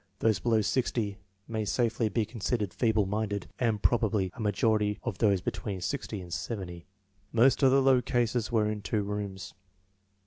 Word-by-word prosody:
Those 110 0 +2
below 115 -2 +2
60 105 -3 -1 0.3
may 110 -1 -2
safely 115 +1 0
be 110 +2 0
considered 105 -2 -2
feeble 110 -4 +2
minded* 100 -1 -2
and 115 -4 0
probably 110 -5 +2
a - - -15
majority 105 0 +1
of 115 -7 -4
those 100 -4 +3
be - - -1
tween 95 +1 -5
60 110 +1 -3
and 90 -2 -8
70. 90 -6 -5 0.4
Most 120 +5 +4
of 135 - +6
the 135 +1 +4
low 130 -2 +5
cases 120 -3 0
were 110 -2 +2
in 105 -1 -3
two 105 +1 -1
rooms. 100 -1 -5
110 Hz, 170 wpm, -29 LUFS, 100-115 Hz, 0.4 s, of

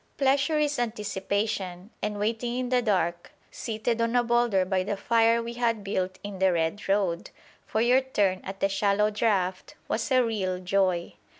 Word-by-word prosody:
Pleasure 275 +3 +2
is 295 -2 +1
anticipation; 200 -3 -2
and 210 -1 -2
waiting 230 +3 -1
in 255 -1 -2
the 250 -1 +3
dark, 175 -6 -1 0.2
seated 230 +1 -2
on 230 +1 0
a 245 - +4
boulder 235 -5 +2
by 185 0 0
the 205 +2 -2
fire 230 +2 +3
we 235 +1 -5
had 230 -3 0
built 185 -1 -2
in 205 -2 -6
the 190 0 +4
red 170 +4 -1
road, 195 -4 0 0.4
for 220 - 0
your 250 +3 +4
turn 200 -8 0
at 195 0 -7
the 195 - +4
shallow 200 +1 +1
draught 195 -4 0
was - - -1
a 255 -1 +5
real 195 -5 -1
joy. 185 -1 0
210 Hz, 175 wpm, -27 LUFS, 190-235 Hz, 0.4 s, a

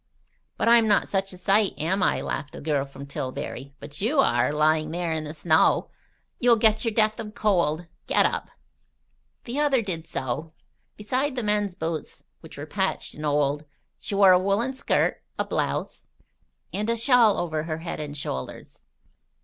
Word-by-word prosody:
"But - - 0
I'm 230 -1 +6
not 205 -1 +3
such 195 0 -1
a 185 - -9
sight, 195 +2 +2
am 185 +5 0
I?" - - +2
laughed 145 - -4
the - - -8
girl 145 -2 0
from 140 0 -10
Tillbury. 140 0 -6
"But 145 +3 -5
you 265 +8 +1
are, 270 - +3
lying 155 +1 +2
there 170 0 -2
in 155 -1 -3
the 150 - -5
snow. 160 +1 +2 0.5
You'll 240 -1 +5
get 220 -1 +3
your 230 - 0
death 215 +1 +2
of 215 -1 -7
cold. 175 -7 +1 0.2
Get - - +4
up." - - -1 0.9
The 255 +4 -4
other 275 -5 +2
did 165 -5 -4
so. 150 +5 -4 0.4
Beside 255 +6 -1
the 245 - -2
men's 210 -3 0
boots, 160 -3 -5 0.2
which - - -13
were - - -6
patched - - -2
and 150 0 -4
old, 145 0 +1 0.4
she 200 - -4
wore 195 -1 +7
a 180 - +6
woollen 200 +7 0
skirt, 260 - 0 0.2
a - - 0
blouse, - - -3 0.7
and 210 +2 -2
a 235 - +1
shawl 230 -3 +5
over 160 -3 -2
her 155 -1 -3
head 165 0 -6
and 150 -1 -5
shoulders. 65 - -6
185 Hz, 175 wpm, -25 LUFS, 155-220 Hz, 0.9 s, wore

